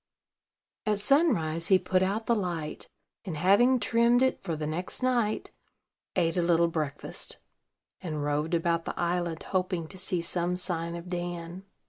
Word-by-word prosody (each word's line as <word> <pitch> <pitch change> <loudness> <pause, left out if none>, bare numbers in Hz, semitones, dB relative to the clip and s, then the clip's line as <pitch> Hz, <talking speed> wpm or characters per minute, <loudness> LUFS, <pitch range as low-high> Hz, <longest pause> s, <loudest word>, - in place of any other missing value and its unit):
At 210 -1 +2
sunrise 205 - +2
he 190 - +6
put 185 0 +1
out 200 +4 0
the 235 - +3
light, 170 -7 -3 0.4
and, 180 -6 -5
having 215 +10 +5
trimmed 235 +2 +4
it 260 - +1
for 170 -4 -3
the 155 0 -4
next 175 - -4
night, 240 -4 +1 0.6
ate 165 -1 +1
a - - +3
little 170 0 +3
breakfast, 155 -4 -3 0.6
and 155 -5 -3
roved 150 +3 0
about 170 0 0
the - - -5
island 175 -1 -1
hoping 180 -3 -1
to 190 - -9
see 185 -1 0
some 175 +1 0
sign 170 -2 -1
of 170 +1 -7
Dan. 175 +1 -5
175 Hz, 155 wpm, -28 LUFS, 165-195 Hz, 0.6 s, he